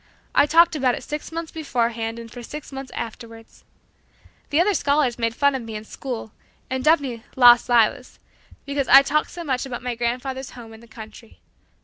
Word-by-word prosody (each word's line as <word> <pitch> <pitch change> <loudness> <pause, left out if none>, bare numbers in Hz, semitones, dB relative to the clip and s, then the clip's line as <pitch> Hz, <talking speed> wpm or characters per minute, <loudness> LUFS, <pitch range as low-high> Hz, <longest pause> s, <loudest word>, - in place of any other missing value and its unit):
I 290 - +4
talked 335 +2 +5
about 260 -4 +1
it - - -9
six 300 +2 -6
months 330 0 -5
beforehand 235 -6 -2
and 230 -1 -10
for 245 - -9
six 295 +6 -9
months 270 -1 -8
afterward. 225 0 -7 1.0
The 295 - +1
other 400 +4 +3
scholars 285 -6 +1
made 230 0 -1
fun 280 -1 +3
of 265 - -3
me 225 -1 -8
in 210 - -6
school, 235 -1 -7 0.4
and 260 0 -2
dubbed 310 -1 +4
me 235 -4 -6
"Las 245 -1 +6
Lilas" 240 +1 +2 0.5
because 280 -1 -2
I 270 +2 +8
talked 300 +2 0
so 345 - -8
much 260 -5 -1
about 245 -1 -6
my 250 -1 -2
grandfather's 250 +3 -4
home 225 -2 -11
in 220 - -13
the 235 - -17
country. 220 0 -13
255 Hz, 195 wpm, -22 LUFS, 230-285 Hz, 1.0 s, I